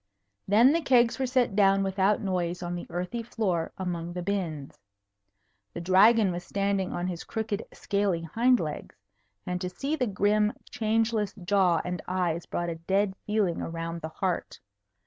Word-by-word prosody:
Then 230 +8 +6
the 335 - +1
kegs 245 -4 +3
were 260 - 0
set 250 -5 +1
down 195 -1 +4
without 195 +1 +1
noise 180 -2 -2
on 175 0 -3
the 175 - -5
earthy 180 +7 -3
floor 195 -8 -2
among 175 -2 -4
the 180 0 -4
bins. 170 -7 -3 1.0
The - - -3
Dragon 195 +4 +5
was 175 0 -5
standing 200 0 -1
on 175 - -3
his 180 -2 -4
crooked 220 -2 -3
scaly 200 -4 -1
hind 240 +9 +3
legs; 150 -2 -5 0.5
and 180 0 -3
to 180 - -2
see 275 +11 -2
the 255 -5 0
grim, 210 +2 +2 0.2
changeless 220 -2 0
jaw 185 -3 +2
and 180 0 -3
eyes 175 -2 -1
brought 175 0 -2
a 165 - -4
dead 195 0 +2
feeling 210 -5 0
around 165 0 -4
the 160 - -5
heart. 180 +1 -3
190 Hz, 165 wpm, -28 LUFS, 175-215 Hz, 1.0 s, Then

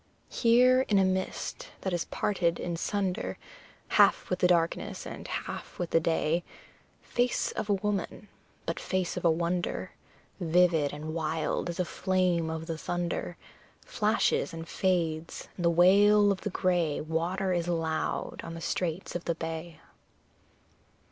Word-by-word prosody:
Here 250 +2 +5
in 205 - +4
a 190 - +5
mist 185 0 -2
that 190 - -2
is 175 - -1
parted 175 -4 0
in 170 -1 -3
sunder, 195 +2 -2 0.5
Half - - +4
with 180 - 0
the 180 - +4
darkness 170 -2 0
and - - -7
half - - -5
with 175 -2 -3
the 165 - +5
day; 165 0 +1 0.6
Face 245 0 0
of 215 - -4
a - - +4
woman, 205 +1 -3 0.4
but - - -2
face 185 -2 -1
of 180 - -4
a 170 - +5
wonder, 170 +2 -1 0.5
Vivid 170 -4 +3
and 155 +2 -6
wild 160 +1 -1
as 170 - -5
a 180 - +2
flame 180 -3 +1
of 160 0 -4
the 165 -1 -4
thunder, 175 0 -3 0.5
Flashes 210 -4 +1
and 165 0 -7
fades, 170 -4 -1
and 175 - -3
the - - +6
wail 200 +4 +6
of 190 - -2
the 210 - -2
grey 175 -5 +1
Water 175 +4 -1
is 175 -1 -1
loud 165 -2 -2
on 165 - -6
the - - -6
straits 170 +1 -2
of 175 - -4
the 170 - 0
bay! 165 0 -6
175 Hz, 155 wpm, -29 LUFS, 165-190 Hz, 0.6 s, the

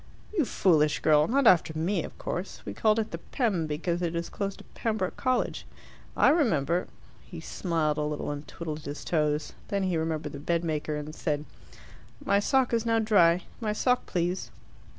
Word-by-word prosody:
"You 325 -8 +3
foolish 155 -8 +3
girl, 150 -1 +4
not 275 +2 +2
after 165 -6 +5
me, 170 +1 0
of - - -9
course. 180 +3 -5
We - - -5
called 215 0 +2
it 220 -1 -1
the 170 - -5
'Pem' 195 - -1
because 170 +3 -2
it 170 -1 -1
is 170 0 -2
close 200 -1 -3
to - - -13
Pembroke 215 -5 -1
College. 255 -2 0 0.5
I - - +6
remember 175 - +2 0.2
" - - -26
He 170 - -7
smiled 160 -3 -1
a - - +1
little, 150 0 -2
and 145 0 -6
twiddled 155 -2 -5
his 145 -1 -7
toes. 150 -2 0
Then 200 -1 -1
he 185 -3 0
remembered 160 -2 -2
the 140 - -6
bedmaker, 155 -1 -1
and 150 +1 -5
said, 150 -2 -2 0.8
"My 200 - +4
sock 260 +3 +2
is 230 -1 +2
now 230 -1 +2
dry. 185 -6 +4 0.2
My 215 -3 -1
sock, 250 +3 +1
please." 175 +1 -1
170 Hz, 185 wpm, -28 LUFS, 155-210 Hz, 0.8 s, I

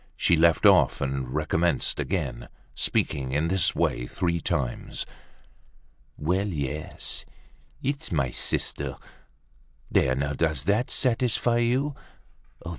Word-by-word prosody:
She 85 - +3
left 85 +4 +4
off 95 -8 +5
and 70 -2 -2
recommenced 80 +4 0
again, 70 -10 -3 0.2
speaking 65 -1 0
in 75 +4 +1
this 95 -3 +2
way - - 0
three 85 +1 -1
times: 60 -6 -2 1.1
"Well, 90 +7 0
yes! 75 -4 -2 0.6
it's 140 +1 -2
my 70 -6 0
sister. - - -2 0.9
There 65 -1 +3
now, 70 +2 -1
does 80 -2 0
that 105 +5 +1
satisfy 120 -2 +2
you? 130 +5 +1
80 Hz, 110 wpm, -26 LUFS, 70-100 Hz, 1.1 s, off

